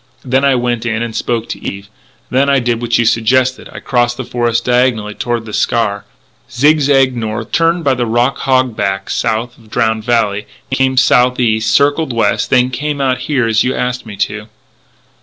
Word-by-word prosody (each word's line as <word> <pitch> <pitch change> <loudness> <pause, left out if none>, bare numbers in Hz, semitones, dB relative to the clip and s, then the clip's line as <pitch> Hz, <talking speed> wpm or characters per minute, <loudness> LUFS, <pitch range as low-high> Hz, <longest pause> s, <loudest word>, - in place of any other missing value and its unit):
Then 130 +2 +1
I 140 -1 +3
went 120 -2 -1
in 115 -1 -1
and 115 -2 -6
spoke 115 -1 -2
to - - -6
Eve. 100 0 -6 0.4
Then 135 +2 +2
I 140 - +4
did 120 -2 -1
what 120 -1 +1
you 120 - +1
suggested 125 +3 +1
I - - -8
crossed 120 -1 0
the 130 - -4
forest 120 -1 -1
diagonally 125 -4 +1
toward 120 0 -3
The 110 - -9
Scaur, 105 -3 0 0.5
zig 145 +6 +3
zagged 135 -2 +3
north, 110 0 -4
turned 165 +1 +1
by 140 - +2
the 125 -2 -2
rock 120 +4 +1
hog 130 -3 +1
back 95 -1 -2
south 115 +2 -2
of 110 -2 -20
Drowned 110 -1 0
Valley, 105 -4 0 0.2
came 130 0 +1
southeast, 125 -3 +3
circled 145 +2 +2
west, 115 -3 0
and 125 0 +3
came 145 +2 -3
out 130 -2 0
here 130 -2 0
as 110 -1 +2
you 130 - -1
asked 125 -1 -3
me 105 - -8
to." 105 +2 -3
120 Hz, 190 wpm, -15 LUFS, 115-130 Hz, 0.5 s, I